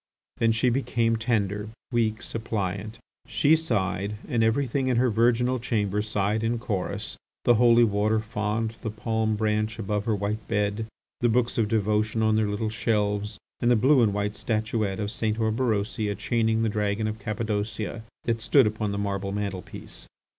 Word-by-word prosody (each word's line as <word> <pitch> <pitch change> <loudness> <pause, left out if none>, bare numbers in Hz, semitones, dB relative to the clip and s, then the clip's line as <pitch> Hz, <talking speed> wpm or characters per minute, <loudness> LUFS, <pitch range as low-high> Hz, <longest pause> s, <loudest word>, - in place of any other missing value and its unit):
Then 115 0 +3
she 120 +2 +2
became 115 -3 +1
tender, 105 -2 -1 0.2
weak, 110 -2 0
suppliant. 105 -1 -3 0.3
She 155 +2 +4
sighed, 105 - -1
and 120 -6 +1
everything 130 +3 +1
in 125 -2 +2
her 125 0 +3
virginal 120 +3 +2
chamber 105 -3 0
sighed 105 0 0
in 115 +1 +1
chorus, 105 -6 -3 0.3
the 120 - +6
holy 120 0 +6
water 105 0 +2
font, 110 +1 -2
the 110 - -3
palm 110 0 -1
branch 110 0 0
above 105 -1 -2
her 110 - +1
white 105 +2 -3
bed, 105 0 -1 0.3
the 120 - +2
books 120 +1 +1
of 110 - +2
devotion 110 +1 +1
on 110 0 +3
their 110 -1 +2
little 105 +1 -2
shelves, 105 -2 0 0.2
and 120 - +2
the 120 - +6
blue 130 +4 +5
and 110 -3 +4
white 105 +1 -2
statuette 110 -3 -1
of 105 -1 -2
St. 110 -1 -1
Orberosia 110 -2 0
chaining 110 +1 +1
the - - +2
dragon 105 0 -1
of 110 +1 -4
Cappadocia, 110 0 -3 0.2
that 115 -1 -1
stood 135 +2 +5
upon 105 -1 -1
the 100 - -3
marble 100 -1 -2
mantelpiece. 100 -2 -6
110 Hz, 165 wpm, -26 LUFS, 105-115 Hz, 0.3 s, the